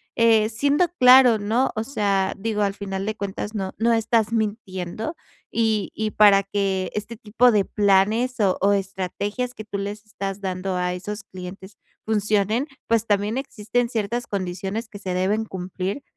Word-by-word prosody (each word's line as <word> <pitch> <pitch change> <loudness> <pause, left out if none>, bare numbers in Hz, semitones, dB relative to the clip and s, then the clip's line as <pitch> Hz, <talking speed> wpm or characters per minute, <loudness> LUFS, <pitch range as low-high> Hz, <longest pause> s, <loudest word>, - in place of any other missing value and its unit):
eh, 225 -2 +4
siendo 285 +9 +2
claro, 250 -2 +8
¿no? 225 +6 +1
O 220 - -1
sea, 200 -7 0
digo, 210 0 -2
al 200 -1 0
final 195 -1 -4
de 215 - -2
cuentas, 205 +1 -5
no 190 -2 -3
no 230 +1 +2
estás 225 0 +1
mintiendo 215 - -3 0.4
y 220 -3 +1
y 215 -1 -2
para 200 -2 +6
que 195 -1 -1
este 210 +2 -4
tipo 230 +2 +3
de 205 -2 +4
planes 210 +5 +2
o 190 -3 +2
o 200 +1 +4
estrategias 200 +5 -3
que 215 - -8
tú 210 -1 -5
les 205 +2 -5
estás 195 -1 -5
dando 185 0 -3
a 180 0 -1
esos 205 +5 -6
clientes 190 +2 -10 0.3
funcionen, 215 +4 +1 0.2
pues, 230 -1 +1
también 205 +3 +1
existen 240 -2 -1
ciertas 235 +1 -2
condiciones 195 +3 -4
que 205 - -10
se 185 -3 -4
deben 200 +5 0
cumplir 190 +5 -5
210 Hz, 165 wpm, -23 LUFS, 195-225 Hz, 0.4 s, claro